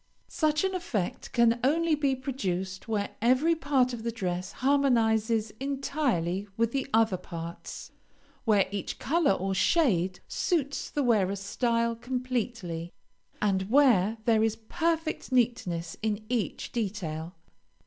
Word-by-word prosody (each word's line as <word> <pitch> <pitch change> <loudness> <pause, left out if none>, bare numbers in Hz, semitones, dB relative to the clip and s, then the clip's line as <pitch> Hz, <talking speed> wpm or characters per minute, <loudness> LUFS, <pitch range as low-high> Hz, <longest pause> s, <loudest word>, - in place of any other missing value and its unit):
Such 305 0 +1
an 380 0 0
effect 250 - -3
can 235 -1 +3
only 325 +4 +3
be 285 -3 +2
produced 190 -9 -3
where 210 -2 -1
every 260 +8 +4
part 270 -5 +1
of 235 - -5
the 235 +1 -2
dress 185 -3 -3
harmonizes 230 -5 +2
entirely 265 - -1
with 230 0 +2
the 270 0 -1
other 220 -4 +3
parts, 170 -1 -8 0.5
where 205 -4 +3
each 200 -2 -4
color 325 - +2
or 195 0 -1
shade 190 - +2
suits 285 -6 -1
the 290 - -1
wearer's 200 -5 +2
style 230 +3 0
completely, 240 -9 -3 0.5
and 190 -1 +1
where 230 -6 +4
there 225 -2 +4
is 220 -1 +1
perfect 325 +6 -2
neatness 185 -10 0
in 215 -1 -2
each 240 -4 -2
detail. 180 -7 -3
230 Hz, 130 wpm, -28 LUFS, 195-270 Hz, 0.5 s, every